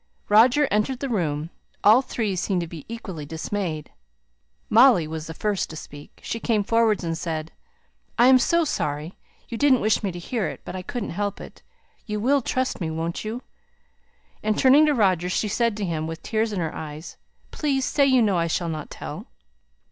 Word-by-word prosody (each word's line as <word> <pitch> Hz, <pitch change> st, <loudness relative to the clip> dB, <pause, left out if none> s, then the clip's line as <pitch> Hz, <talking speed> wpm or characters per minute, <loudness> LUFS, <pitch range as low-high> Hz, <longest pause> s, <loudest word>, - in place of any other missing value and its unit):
Roger 245 Hz, +7 st, +5 dB
entered 215 Hz, +5 st, 0 dB
the 275 Hz, -, -3 dB
room. 165 Hz, -, -2 dB, 0.3 s
All 220 Hz, +5 st, +7 dB
three 220 Hz, -6 st, -2 dB
seemed 185 Hz, 0 st, 0 dB
to 170 Hz, -, -4 dB
be 160 Hz, -3 st, -10 dB
equally 195 Hz, -9 st, -6 dB
dismayed. 160 Hz, 0 st, -4 dB, 0.8 s
Molly 225 Hz, -8 st, +6 dB
was 160 Hz, 0 st, -6 dB
the 160 Hz, -, -6 dB
first 205 Hz, -1 st, -1 dB
to 160 Hz, -, -8 dB
speak; 145 Hz, -1 st, -11 dB
she 230 Hz, -, -3 dB
came 220 Hz, -3 st, +1 dB
forward 225 Hz, -2 st, +2 dB
and 165 Hz, -1 st, -2 dB
said 160 Hz, -1 st, -4 dB, 0.7 s
"I 240 Hz, -, +6 dB
am 260 Hz, 0 st, +7 dB
so 335 Hz, +6 st, +2 dB
sorry! 150 Hz, -, -2 dB, 0.4 s
I -, -, -2 dB
didn't 265 Hz, -1 st, +4 dB
wish 215 Hz, 0 st, +2 dB
to 200 Hz, -, -2 dB
hear 210 Hz, +4 st, -2 dB
it, -, -, -7 dB
but -, -, -6 dB
I 185 Hz, -, -4 dB
couldn't 235 Hz, +3 st, -5 dB
help 205 Hz, +2 st, -3 dB
it. -, -, -11 dB, 0.5 s
You 210 Hz, -1 st, -2 dB
will 270 Hz, +6 st, +2 dB
trust 255 Hz, -2 st, -2 dB
me, 165 Hz, -, -1 dB
won't 165 Hz, +1 st, -3 dB
you?" 225 Hz, +4 st, -5 dB, 1.0 s
and 215 Hz, 0 st, 0 dB
turning 280 Hz, +4 st, +6 dB
to 295 Hz, -, +2 dB
Roger 185 Hz, -6 st, +2 dB
she 210 Hz, -, 0 dB
said 230 Hz, +1 st, 0 dB
to 205 Hz, -, -2 dB
him 160 Hz, -3 st, -2 dB
with 165 Hz, 0 st, -7 dB
tears 220 Hz, 0 st, 0 dB
in 195 Hz, -4 st, -2 dB
her 160 Hz, -, -2 dB
eyes 155 Hz, +1 st, -8 dB, 0.3 s
"Please 275 Hz, -3 st, 0 dB
say 280 Hz, -2 st, +3 dB
you 260 Hz, -3 st, +4 dB
know 195 Hz, -5 st, +2 dB
I 165 Hz, -, +1 dB
shall 170 Hz, +1 st, -1 dB
not 155 Hz, -2 st, -5 dB
tell." -, -, -8 dB
205 Hz, 195 wpm, -24 LUFS, 165-235 Hz, 1.0 s, All